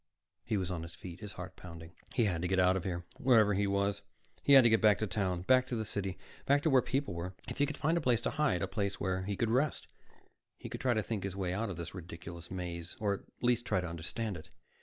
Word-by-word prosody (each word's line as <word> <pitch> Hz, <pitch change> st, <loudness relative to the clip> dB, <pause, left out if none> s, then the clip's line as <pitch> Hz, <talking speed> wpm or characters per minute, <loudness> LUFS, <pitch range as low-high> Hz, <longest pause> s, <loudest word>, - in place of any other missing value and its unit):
He 110 Hz, -2 st, -1 dB
was 95 Hz, -2 st, -2 dB
on 85 Hz, -2 st, -3 dB
his 85 Hz, 0 st, -8 dB
feet, 90 Hz, -1 st, -9 dB
his 105 Hz, -2 st, -7 dB
heart 90 Hz, 0 st, -8 dB
pounding. 85 Hz, -1 st, -10 dB, 0.2 s
He 120 Hz, -, +3 dB
had 90 Hz, -5 st, 0 dB
to 90 Hz, -, 0 dB
get 95 Hz, +1 st, +1 dB
out 90 Hz, 0 st, +5 dB
of 95 Hz, -, -2 dB
here, 85 Hz, -2 st, -3 dB
wherever 115 Hz, -5 st, +5 dB
he 100 Hz, +1 st, +1 dB
was. 100 Hz, 0 st, 0 dB, 0.4 s
He 140 Hz, -, +4 dB
had 135 Hz, -2 st, +10 dB
to 120 Hz, -, +6 dB
get 110 Hz, -, +4 dB
back 105 Hz, -3 st, +6 dB
to 110 Hz, -, -1 dB
town, 90 Hz, -3 st, -1 dB
back 130 Hz, +5 st, +4 dB
to 125 Hz, -, -2 dB
the 110 Hz, -1 st, -2 dB
city, 100 Hz, -2 st, -3 dB, 0.3 s
back 145 Hz, +1 st, +4 dB
to 160 Hz, -, +3 dB
where 130 Hz, -1 st, +6 dB
people 135 Hz, -4 st, -1 dB
were. 90 Hz, +2 st, -5 dB
If -, -, -6 dB
he 145 Hz, -, +4 dB
could 150 Hz, -, -5 dB
find 160 Hz, +3 st, +1 dB
a -, -, -5 dB
place 125 Hz, -4 st, +2 dB
to -, -, -1 dB
hide, 150 Hz, -, +1 dB
a -, -, 0 dB
place 100 Hz, 0 st, -2 dB
where 95 Hz, -1 st, -1 dB
he 100 Hz, 0 st, -2 dB
could 115 Hz, +3 st, 0 dB
rest, 140 Hz, +5 st, +1 dB, 0.7 s
he -, -, -8 dB
could -, -, -6 dB
try 125 Hz, -3 st, +2 dB
to 110 Hz, -, +1 dB
think 105 Hz, -3 st, -3 dB
his 95 Hz, -1 st, -3 dB
way 95 Hz, -2 st, -1 dB
out 105 Hz, +3 st, -1 dB
of 90 Hz, -, -5 dB
this 85 Hz, -2 st, -6 dB
ridiculous 85 Hz, -1 st, -8 dB
maze, 85 Hz, -2 st, -5 dB
or 105 Hz, -2 st, +1 dB
at 100 Hz, -, -4 dB, 0.2 s
least 120 Hz, -1 st, +3 dB
try 120 Hz, -, +1 dB
to 90 Hz, -, -3 dB
understand 90 Hz, +5 st, -4 dB
it. 80 Hz, +1 st, -12 dB
100 Hz, 270 wpm, -33 LUFS, 90-115 Hz, 0.7 s, had